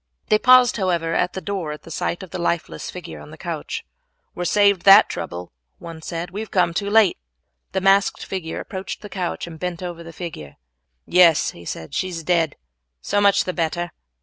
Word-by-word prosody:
They 215 - +4
paused, 255 -1 +6
however, 170 -4 0
at 180 +2 +1
the 190 - -5
door 185 -3 -3
at 150 - -8
the 165 - -12
sight 175 +3 -2
of 185 - -11
the - - -5
lifeless 170 - -2
figure 80 -2 -8
on 75 - -12
the - - -12
couch. - - -5 0.5
"We - - -7
are - - -1
saved 200 0 +4
that 195 +2 +8
trouble," 85 +1 -6 0.3
one 165 -1 -9
said, 170 +2 -5
"we 200 - -5
have 220 - -5
come 180 -3 +2
too 200 +3 -2
late." 210 -3 +4 0.5
The 190 - 0
masked 195 +1 +3
figure 180 -4 -4
approached 190 0 -6
the 210 - -8
couch 185 -3 -3
and 165 -2 -10
bent 180 0 -4
over 175 -2 -6
the 165 0 -9
figure. 150 - -8 0.5
"Yes," 170 -3 +5
he 85 - -13
said, 80 -1 -6
"she 185 - -1
is 165 -2 -6
dead, 165 -3 +1
and - - -30 0.5
so 205 - +1
much 200 0 +4
the 185 - -3
better." 175 +1 -2
175 Hz, 210 wpm, -22 LUFS, 165-195 Hz, 0.5 s, that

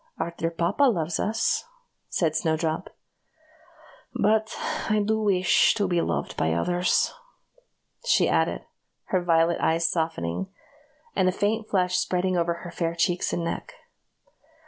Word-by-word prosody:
"Our 170 - -2
dear 165 - -1
papa 170 +11 +1
loves 170 - 0
us," 225 - 0 0.4
said 160 -3 0
Snowdrop, 160 0 -1 1.3
"but 220 +1 +2 0.3
I 215 0 +3
do 220 +1 +1
wish 185 -3 +3
to 205 -3 0
be 175 -2 +1
loved - - -2
by 80 0 0
others," 175 - +1 0.9
she - - +4
added - - 0 0.5
her 185 -1 +2
violet 165 0 +2
eyes 165 +1 +2
softening, 160 - -2 0.7
and 185 -2 +3
a - - +1
faint 215 +4 -1
flush 180 -2 +1
spreading 185 0 0
over 170 0 0
her 175 - -6
fair 165 -1 -2
cheeks 175 +1 0
and 170 - -2
neck. 165 - -4
175 Hz, 135 wpm, -25 LUFS, 165-195 Hz, 1.3 s, she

